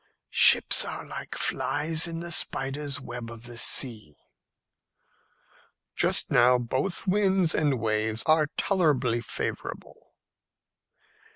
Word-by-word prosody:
"Ships - - +5
are - - -6
like - - -8
flies 155 +3 0
in 165 0 -6
the 170 0 -6
spider's 140 -2 -1
web 120 -3 -7
of 115 -1 -11
the 120 0 -7
sea." 110 - +1 1.8
"Just - - +1
now 125 +1 +4
both 130 +9 -3
winds 190 -3 +1
and 145 -5 0
waves 110 0 -1
are 155 -1 +3
tolerably 140 - 0
favourable." - - -7
135 Hz, 105 wpm, -26 LUFS, 120-165 Hz, 1.8 s, Ships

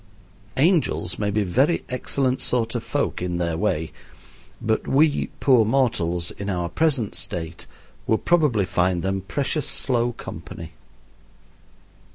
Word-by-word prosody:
Angels 150 - +2
may 105 -1 0
be 105 +1 +1
very 130 - +2
excellent 130 0 -1
sort 115 -2 0
of - - -2
folk - - -1
in 90 -1 -2
their 85 -2 -1
way, 80 -4 -1 0.7
but 110 -1 -1
we, 145 +2 +3
poor 125 -5 +5
mortals, 105 -9 +1
in 100 0 -6
our 90 -3 -1
present 135 - +1
state, 85 -1 -5 0.4
would 110 - +1
probably 150 - +3
find 90 -1 +1
them 95 0 -1
precious 140 - -1
slow 120 -2 +1
company. 85 -6 -8
110 Hz, 130 wpm, -23 LUFS, 90-135 Hz, 0.7 s, poor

